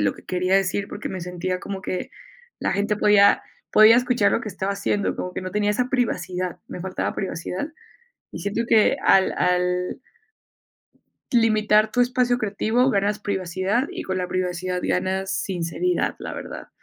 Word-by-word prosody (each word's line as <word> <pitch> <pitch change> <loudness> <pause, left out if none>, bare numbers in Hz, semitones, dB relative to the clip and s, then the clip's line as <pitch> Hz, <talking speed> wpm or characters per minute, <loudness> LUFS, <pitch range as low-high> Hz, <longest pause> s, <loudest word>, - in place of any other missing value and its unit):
lo 105 - +2
que - - -16
quería 185 +1 +1
decir, 195 +1 0
porque 210 - -6
me 185 - -5
sentía 180 +1 -3
como 195 -1 -5
que 185 - -4 0.5
la - - -1
gente 205 +2 0
podía 205 -1 +5 0.3
podía 215 +2 +8
escuchar 245 -4 +2
lo - - +1
que 220 - -6
estaba 190 +1 -3
haciendo, 200 0 -1
como 180 - -5
que - - -4
no 185 0 -6
tenía 210 0 +1
esa 245 +4 0
privacidad, 185 -8 -2
me 180 - -8
faltaba 185 0 -3
privacidad, 190 - -4 0.6
y - - -7
siento 205 +3 -2
que 220 -1 +4
al 190 -1 +5
al 180 +4 0 1.3
limitar 215 -2 +3
tu 245 - +1
espacio 245 0 +2
creativo 220 +4 +1
ganas 205 0 0
privacidad 190 +5 -1
y - - -6
con 185 0 -3
la 180 - -2
privacidad 180 0 -2
ganas 190 +1 -1
sinceridad, 190 - -1
la - - -6
verdad, - - -8
195 Hz, 165 wpm, -23 LUFS, 185-215 Hz, 1.3 s, podía